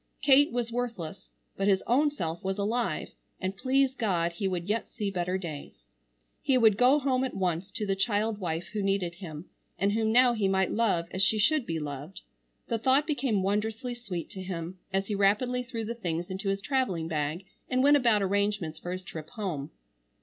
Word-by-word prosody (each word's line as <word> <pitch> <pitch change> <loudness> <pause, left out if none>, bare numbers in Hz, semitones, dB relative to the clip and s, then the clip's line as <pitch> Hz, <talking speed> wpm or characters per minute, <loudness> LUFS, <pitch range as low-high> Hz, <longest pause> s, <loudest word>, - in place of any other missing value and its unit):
Kate 285 +1 +6
was 235 -1 -2
worthless, 230 -8 -4 0.3
but 195 - 0
his 195 -2 +3
own 280 +6 +3
self 170 - -4
was 190 +1 -1
alive, 225 +4 -1 0.3
and 190 0 -2
please 265 +4 +2
God 180 -9 0
he 180 +4 -2
would 180 -2 -2
yet 215 +2 -1
see 205 -2 -3
better 180 0 -1
days. 150 - -8 0.6
He 265 - +3
would 220 -4 +5
go 250 +6 +5
home 265 -3 +1
at 260 - -3
once 185 0 -1
to 215 +1 -4
the 195 -1 0
child 210 +1 0
wife 170 -2 -3
who 210 - -1
needed 195 -3 0
him, 170 -3 -8 0.3
and 200 +3 +2
whom 220 +1 +1
now 245 +1 +6
he 215 -4 +1
might 190 0 +2
love 210 -7 +1
as 190 - -2
she 215 +2 +3
should 290 +5 +2
be 165 -1 -1
loved. 145 +4 -6 0.5
The 230 - -1
thought 265 +5 +3
became 255 - 0
wondrously 220 +5 -1
sweet 200 -8 -5
to 190 - -7
him 180 -1 -5
as 195 +1 0
he 210 - -3
rapidly 210 +6 +2
threw 235 -3 -5
the 230 - -3
things 175 -6 -3
into 195 +2 -2
his 195 0 -1
travelling 225 - 0
bag 155 +3 -2 0.2
and 255 0 +2
went 290 +1 +7
about 230 -7 +4
arrangements 200 -5 0
for 175 - -4
his 185 0 -5
trip 160 -4 -8
home. 175 -11 -4
200 Hz, 200 wpm, -29 LUFS, 180-240 Hz, 0.6 s, went